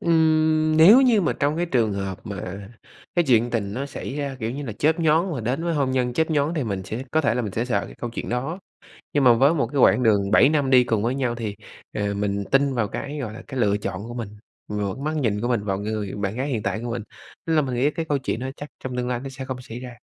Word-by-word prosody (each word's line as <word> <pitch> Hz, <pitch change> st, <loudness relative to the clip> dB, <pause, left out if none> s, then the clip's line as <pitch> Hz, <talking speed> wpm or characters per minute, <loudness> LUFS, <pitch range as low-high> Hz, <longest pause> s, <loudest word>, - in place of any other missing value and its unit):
Ừm, 155 Hz, -1 st, +3 dB
nếu 190 Hz, +11 st, +9 dB
như 245 Hz, -5 st, +4 dB
mà 170 Hz, -, +1 dB
trong 145 Hz, +2 st, 0 dB
cái 175 Hz, -, 0 dB
trường 115 Hz, -9 st, +1 dB
hợp 95 Hz, -1 st, -4 dB
mà 100 Hz, -1 st, -6 dB, 0.5 s
cái 175 Hz, -1 st, +3 dB
chuyện 120 Hz, -1 st, +4 dB
tình 100 Hz, -4 st, -2 dB
nó 140 Hz, +3 st, -3 dB
xảy 140 Hz, 0 st, -6 dB
ra, 140 Hz, -2 st, -3 dB
kiểu 110 Hz, 0 st, -2 dB
như 140 Hz, +4 st, -5 dB
là, 115 Hz, -, -4 dB
chớp 155 Hz, +9 st, +1 dB
nhoáng 165 Hz, +3 st, +2 dB
và 135 Hz, -, -3 dB
đến 130 Hz, +8 st, -2 dB
với 170 Hz, -1 st, 0 dB
hôn 140 Hz, -3 st, +1 dB
nhân 125 Hz, -2 st, 0 dB
chớp 160 Hz, +5 st, 0 dB
nhoáng 150 Hz, +2 st, +1 dB
thì 150 Hz, -5 st, -1 dB
mình 100 Hz, -4 st, -3 dB
sẽ 110 Hz, +6 st, -5 dB
có 155 Hz, -, +2 dB
thể 115 Hz, -7 st, +1 dB
là 125 Hz, -, 0 dB
mình 105 Hz, -, -4 dB
sẽ 115 Hz, -, -1 dB
sợ 105 Hz, -7 st, 0 dB
cái -, -, -12 dB
câu 120 Hz, -, -4 dB
chuyện 115 Hz, -, -5 dB
đó. 135 Hz, +9 st, -2 dB, 0.5 s
Nhưng 145 Hz, -2 st, +2 dB
mà 125 Hz, -, +8 dB
với 135 Hz, +7 st, +4 dB
một 140 Hz, -7 st, +1 dB
cái 140 Hz, +5 st, -8 dB
quãng 125 Hz, -, +5 dB
đường 100 Hz, -4 st, +3 dB
7 130 Hz, -, +6 dB
năm 145 Hz, -3 st, +1 dB
đi 125 Hz, -1 st, +6 dB
cùng 110 Hz, -4 st, 0 dB
với 120 Hz, +3 st, 0 dB
nhau 130 Hz, -3 st, -1 dB
thì, 110 Hz, -4 st, -5 dB, 0.4 s
à, 105 Hz, -1 st, -1 dB
mình 100 Hz, 0 st, -1 dB
tin 135 Hz, 0 st, +3 dB
vào 115 Hz, -4 st, 0 dB
cái, 145 Hz, +7 st, -5 dB
gọi 115 Hz, -5 st, -4 dB
là, -, -, -9 dB
cái 130 Hz, -2 st, -4 dB
lựa 105 Hz, -3 st, +3 dB
chọn 100 Hz, -1 st, -5 dB
của 120 Hz, -, -7 dB
mình, 115 Hz, -4 st, -4 dB, 0.4 s
vào 105 Hz, -2 st, -2 dB
cái 135 Hz, -, -9 dB
mắt 155 Hz, +1 st, -1 dB
nhìn 110 Hz, -8 st, 0 dB
của 120 Hz, -, -1 dB
mình, 120 Hz, -5 st, 0 dB
vào 95 Hz, -2 st, -1 dB
người 105 Hz, -1 st, -3 dB
bạn 100 Hz, +2 st, -3 dB
gái 135 Hz, +3 st, -2 dB
hiện 115 Hz, -7 st, -2 dB
tại 110 Hz, -, -2 dB
của 120 Hz, -, -3 dB
mình, 115 Hz, -1 st, -3 dB, 0.4 s
tức 165 Hz, -, +1 dB
là 155 Hz, -, +4 dB
mình 130 Hz, -2 st, -3 dB
nghĩ 135 Hz, +5 st, +2 dB
cái 165 Hz, +2 st, -3 dB
câu 145 Hz, -1 st, +1 dB
chuyện 130 Hz, -3 st, -3 dB
đó 130 Hz, -, -3 dB
chắc 145 Hz, -, -8 dB, 0.2 s
trong 125 Hz, -1 st, -4 dB
tương 125 Hz, 0 st, -1 dB
lai 125 Hz, -1 st, -1 dB
nó 135 Hz, -, -6 dB
sẽ 135 Hz, 0 st, -7 dB
không 130 Hz, -1 st, -5 dB
xảy 120 Hz, -1 st, -8 dB
ra. 125 Hz, -1 st, -8 dB
125 Hz, 290 wpm, -23 LUFS, 110-145 Hz, 0.5 s, nếu